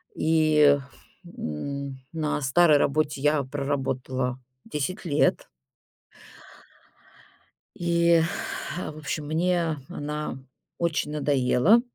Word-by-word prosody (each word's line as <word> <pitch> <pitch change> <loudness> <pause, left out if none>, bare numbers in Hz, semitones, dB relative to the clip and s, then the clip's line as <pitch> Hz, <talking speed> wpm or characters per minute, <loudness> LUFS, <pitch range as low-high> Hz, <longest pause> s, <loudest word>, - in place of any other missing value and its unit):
И, 155 -2 +4 0.6
м, 135 - -5
на 155 -2 -1
старой 150 +3 +5
работе 145 0 0
я 150 0 +2
проработала 130 -2 -2 0.3
10 180 +8 -4
лет. 150 -3 +1 2.3
И, 170 -1 +3 0.6
в 155 -4 -5
общем, 155 0 -4
мне 165 0 +1
она 150 -1 -4 0.4
очень 165 -3 -1
надоела. 145 - +3
150 Hz, 80 wpm, -26 LUFS, 140-160 Hz, 2.3 s, старой